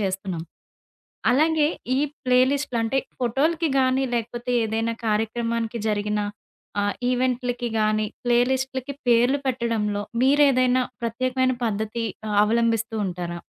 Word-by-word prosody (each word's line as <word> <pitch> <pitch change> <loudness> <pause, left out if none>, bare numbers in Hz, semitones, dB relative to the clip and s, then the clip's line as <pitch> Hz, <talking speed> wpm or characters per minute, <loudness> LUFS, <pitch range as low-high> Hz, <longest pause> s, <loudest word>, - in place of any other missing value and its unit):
చేస్తున్నాం. 190 -4 -2 0.9
అలాగే, 305 +2 +3 0.3
ఈ - - +2 0.3
ప్లే 250 0 +4
లిస్టులు 280 -4 -1
అంటే 270 +4 +1 0.2
ఫోటోలకి 305 +7 +1
గానీ, 260 +1 +2
లేకపోతే 240 +1 -3
ఏదైనా 225 +1 -1
కార్యక్రమానికి 230 +1 -1
జరిగిన 210 0 0 0.6
ఆహ్, 205 0 0 0.2
ఈవెంట్లకి 245 -1 -1
గానీ, 215 0 +2 0.2
ప్లే 240 0 +4
లిస్ట్‌లకి 265 +1 -2
పేర్లు 245 +4 +4
పెట్టడంలో 225 -5 -1 0.2
మీరేదైనా 260 -2 +4 0.2
ప్రత్యేకమైన 255 +2 0
పద్ధతి 220 +1 -2 0.4
అవలంబిస్తుంటారా? 215 -6 -1
235 Hz, 100 wpm, -24 LUFS, 220-260 Hz, 0.9 s, ప్లే